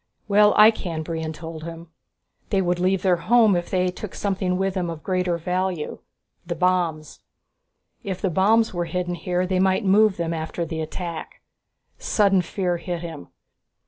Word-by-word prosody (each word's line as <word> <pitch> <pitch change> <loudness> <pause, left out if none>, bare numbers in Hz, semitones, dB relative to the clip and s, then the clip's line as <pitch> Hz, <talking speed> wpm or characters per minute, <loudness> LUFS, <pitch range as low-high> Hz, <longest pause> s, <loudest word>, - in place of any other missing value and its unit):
"Well, 210 0 +5
I 215 +1 +9
can," 170 -7 -5
Brion 160 -1 -4
told 160 0 -8
him. 165 0 -8 0.6
"They 195 - +2
would 175 -1 0
leave 185 +1 +1
their 185 -2 +3
home 220 +2 +4
if 175 0 -2
they 185 -1 +1
took 185 +2 -7
something 190 -2 -1
with 195 0 0
them 180 -3 -2
of 165 -2 -7
greater 180 -2 0
value. 180 -1 -2 0.4
The 170 -1 -4
bombs. 170 -3 0 0.8
If 190 -2 -4
the 190 - -1
bombs 215 +6 +3
were 175 -1 -1
hidden 180 0 -2
here, 180 +1 -1
they 185 0 0
might 190 +3 +2
move 205 +1 +4
them 170 -1 -2
after 160 +1 -3
the 160 0 -4
attack." 165 +1 -6 0.6
Sudden 195 -3 +3
fear 180 0 -2
hit 175 -1 -5
him. 165 -4 -8
180 Hz, 170 wpm, -23 LUFS, 170-190 Hz, 0.8 s, I